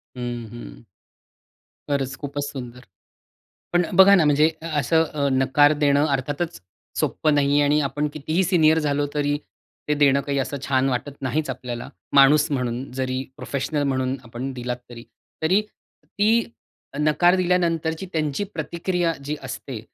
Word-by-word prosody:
हं, 120 -2 -5
हं. - - -10 1.1
खरंच 135 -2 -1
खूपच 145 0 -4
सुंदर. 125 -2 -8 0.9
पण 175 0 +3
बघा 195 +1 +9
ना, 175 -5 +4
म्हणजे 150 +2 +4
असं 160 0 +1
अ, 150 -3 -2
नकार 145 +3 +4
देणं 145 +1 +4
अर्थातच 145 +4 -2 0.4
सोप्पं 155 -1 +1
नाही 140 -1 +2
आहे 145 - +4
आणि 145 +1 +3
आपण 145 +1 -1
कितीही 155 +5 -1
सीनियर 160 -3 +4
झालो 145 -1 0
तरी 145 0 0 0.5
ते 150 - +2
देणं 140 -1 +4
काही 140 0 -2
असं 140 +2 -2
छान 135 0 +2
वाटत 130 +3 -2
नाहीच 145 +3 -1
आपल्याला. 125 -2 -5 0.2
माणूस 145 +2 +6
म्हणून 125 -1 -2
जरी 130 0 -1
प्रोफेशनल 145 +2 -2
म्हणून 130 -1 0
आपण 120 +3 -6
दिलात, 125 -1 -4
तरी 115 -1 -10 0.4
तरी 185 +6 +3 0.4
ती 220 +3 +2 0.6
नकार 155 +4 +4
दिल्यानंतरची 170 -2 0
त्यांची 155 +2 -1
प्रतिक्रिया 170 +2 -1
जी 150 +2 -3
असते. 130 -1 -6
145 Hz, 140 wpm, -23 LUFS, 130-160 Hz, 1.1 s, बघा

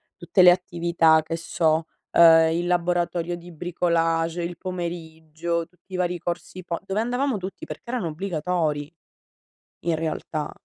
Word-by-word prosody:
tutte 175 +1 +2
le 180 - +9
attività, 170 -3 +3
che 165 +1 -3
so: 160 -1 0 0.2
ehm, 165 -1 +7
il 170 +1 -1
laboratorio 175 -1 0
di 175 +1 -11
bricolage 165 0 0
il 170 -1 -5
pomeriggio, 170 -2 -4
tutti 180 +2 -21
i - - -2
vari 180 -1 0
corsi 175 +2 -5
po 170 -1 -3
dove 195 +3 -1
andavamo 245 +1 0
tutti 190 +1 -7
perchè 235 - -9
erano 235 -8 -1
obbligatori 160 -3 -2 0.9
in 170 -1 0
realtà. 155 -1 -3
170 Hz, 140 wpm, -24 LUFS, 165-180 Hz, 0.9 s, le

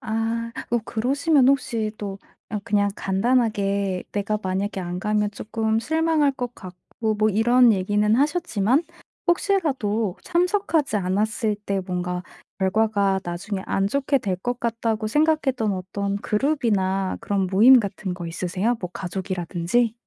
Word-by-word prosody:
아. 225 +1 -2 0.2
어 240 - +3
그러시면 270 +4 +2
혹시 230 -5 +1
또 200 -1 -5 0.3
아 210 - -2
그냥 205 -1 +2
간단하게 200 -3 0
내가 210 +1 -1
만약에 190 +1 -2
안 175 0 -4
가면 210 +1 0
조금 220 +1 -1
실망할 315 +1 +2
것 245 -2 -5
같고 190 +4 -5
뭐 215 +1 +3
이런 235 +2 +5
얘기는 210 +3 +1
하셨지만 290 - +1 0.4
혹시라도 265 - +1
참석하지 350 - +1
않았을 210 +3 0
때 195 -1 -1
뭔가 180 -1 -3 0.4
결과가 200 -1 +2
나중에 190 +3 -4
안 195 0 +1
좋게 275 +5 +1
될 195 -7 -1
것 245 +6 -4
같다고 225 -2 -1
생각했던 270 -6 +1
어떤 200 +2 -3
그룹이나 205 -6 0
그런 195 -2 -1
모임 235 +7 +7
같은 195 -2 -4
거 175 -2 -6
있으세요? 185 +7 -1
뭐 180 - -4
가족이라든지? 185 +4 -1
215 Hz, 295 characters per minute, -23 LUFS, 195-245 Hz, 0.4 s, 모임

